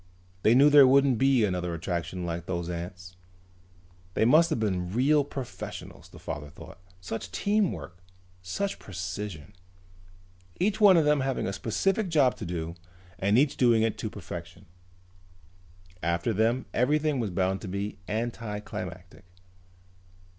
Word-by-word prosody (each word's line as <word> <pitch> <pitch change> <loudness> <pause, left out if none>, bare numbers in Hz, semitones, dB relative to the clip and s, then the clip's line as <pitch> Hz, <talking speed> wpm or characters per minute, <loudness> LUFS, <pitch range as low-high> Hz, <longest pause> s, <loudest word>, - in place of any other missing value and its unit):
They 110 +5 +4
knew 145 +3 +6
there 145 -2 +9
wouldn't 135 -2 +4
be 135 -4 +4
another 90 -3 -2
attraction 85 +1 -3
like 85 0 -4
those 85 -1 -3
ants. 90 +1 -7 1.0
They - - +3
must 155 +7 +5
have - - -1
been 90 -5 -1
real 140 +7 +3
professionals, 135 -3 -8
the - - -14
father 75 0 -6
thought. 75 - -13 0.2
Such 95 +2 -6
teamwork! 200 - -1 0.4
Such 195 - -3
precision! 95 -1 -6 1.1
Each 205 +3 0
one 195 -4 +8
of 160 - +3
them 150 -1 +3
having 135 -1 -1
a 95 - -2
specific 190 - 0
job 145 -6 +3
to - - -6
do 85 -1 -4 0.5
and 100 +3 +2
each 140 +2 +2
doing 115 -3 +4
it 115 -2 -1
to 110 - -3
perfection. 85 -2 -9 1.4
After 85 +7 0
them 115 +5 +1
everything 150 +2 +1
was 115 -4 -1
bound 95 +1 -1
to 105 - -7
be 100 +2 -4
anticlimactic. 105 -6 -5
105 Hz, 140 wpm, -27 LUFS, 90-135 Hz, 1.4 s, there